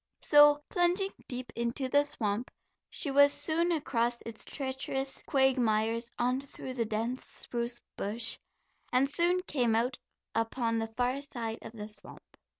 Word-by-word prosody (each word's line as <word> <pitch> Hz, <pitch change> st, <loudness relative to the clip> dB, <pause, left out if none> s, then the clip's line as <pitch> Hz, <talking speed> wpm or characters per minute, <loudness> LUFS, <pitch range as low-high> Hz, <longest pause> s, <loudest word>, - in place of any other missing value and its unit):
So 295 Hz, 0 st, +7 dB
plunging 360 Hz, +2 st, +2 dB, 0.2 s
deep 250 Hz, 0 st, -5 dB
into 235 Hz, +3 st, -1 dB
the 285 Hz, +2 st, +4 dB
swamp, 225 Hz, -4 st, -1 dB, 0.4 s
she 285 Hz, -, +1 dB
was 285 Hz, +1 st, +7 dB
soon 335 Hz, +4 st, 0 dB
across 240 Hz, -7 st, 0 dB
its 225 Hz, -1 st, -8 dB
treacherous 270 Hz, 0 st, -2 dB
quagmires, 235 Hz, -4 st, +2 dB
on 250 Hz, +2 st, +1 dB
through 275 Hz, -2 st, -8 dB
the 235 Hz, -3 st, -1 dB
dense 225 Hz, +4 st, -2 dB
spruce 235 Hz, 0 st, -4 dB, 0.2 s
bush, 225 Hz, +3 st, -2 dB, 0.5 s
and 255 Hz, +2 st, +4 dB
soon 345 Hz, +5 st, +2 dB
came 245 Hz, -, +1 dB
out 245 Hz, +3 st, 0 dB, 0.3 s
upon 230 Hz, 0 st, 0 dB
the 225 Hz, -, -1 dB
far 245 Hz, +4 st, -1 dB
side 235 Hz, -5 st, -4 dB
of -, -, -9 dB
the 210 Hz, -2 st, -6 dB
swamp. 210 Hz, -, -9 dB
250 Hz, 145 wpm, -31 LUFS, 230-280 Hz, 0.5 s, So